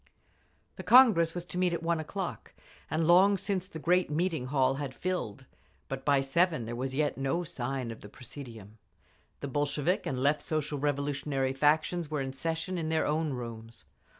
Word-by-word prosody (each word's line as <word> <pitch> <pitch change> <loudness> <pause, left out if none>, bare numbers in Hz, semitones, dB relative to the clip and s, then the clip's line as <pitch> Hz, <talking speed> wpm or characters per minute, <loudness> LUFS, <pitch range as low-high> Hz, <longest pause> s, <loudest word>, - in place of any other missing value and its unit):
The - - -6
Congress 215 -11 +6
was 175 -1 -4
to 180 - -5
meet 180 -1 +2
at 165 0 -3
one 165 -1 +1
o'clock, 180 +4 -5 0.3
and 160 +1 0
long 190 +4 +6
since 190 -1 -2
the 160 - -8
great 180 +3 +2
meeting 160 -3 -1
hall 135 -1 +2
had 140 -2 -5
filled, 175 - -3 0.4
but 135 0 -4
by 140 -2 +3
seven 155 -1 +1
there 120 +1 -5
was 130 +2 -3
yet 145 -1 0
no 135 +6 0
sign 130 -4 -4
of 115 - -10
the 105 - -11
presidium…. 115 -4 -11 0.6
The 140 - -3
Bolshevik 145 +5 0
and 130 - -2
Left 145 +3 +2
Social 150 -2 -2
Revolutionary 140 -1 -1
factions 155 +3 +1
were 150 -2 -2
in 135 -1 -3
session 165 +5 -3
in 160 -1 -2
their 160 0 +1
own 155 -1 0
rooms. 115 -2 -8
150 Hz, 180 wpm, -30 LUFS, 135-170 Hz, 0.6 s, Congress